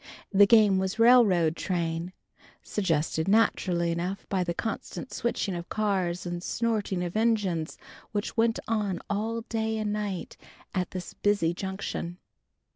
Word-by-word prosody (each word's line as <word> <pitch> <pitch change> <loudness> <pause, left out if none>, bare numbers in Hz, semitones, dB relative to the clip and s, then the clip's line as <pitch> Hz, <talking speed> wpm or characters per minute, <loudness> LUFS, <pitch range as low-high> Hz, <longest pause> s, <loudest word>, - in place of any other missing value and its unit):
The 200 0 +6
game 210 -3 +6
was 190 +2 -2
Railroad 215 -9 +5
Train, 170 -1 -2 0.5
suggested 160 -4 0
naturally 185 -5 +2
enough 180 +4 -3
by 190 -2 +1
the 175 - -2
constant 225 +4 -5
switching 230 -4 -1
of 170 -1 -6
cars 190 -5 0
and 175 0 -4
snorting 210 -4 -1
of 175 +1 -4
engines 210 -8 +1 0.3
which 205 -1 -3
went 225 0 +2
on 210 -5 0
all 225 +3 -1
day 220 -1 -2
and 210 -1 -1
night 205 -3 -4 0.4
at 180 -2 -1
this 185 -1 -6
busy 200 -5 +1
Junction. 190 -2 -4
195 Hz, 135 wpm, -28 LUFS, 175-215 Hz, 0.5 s, The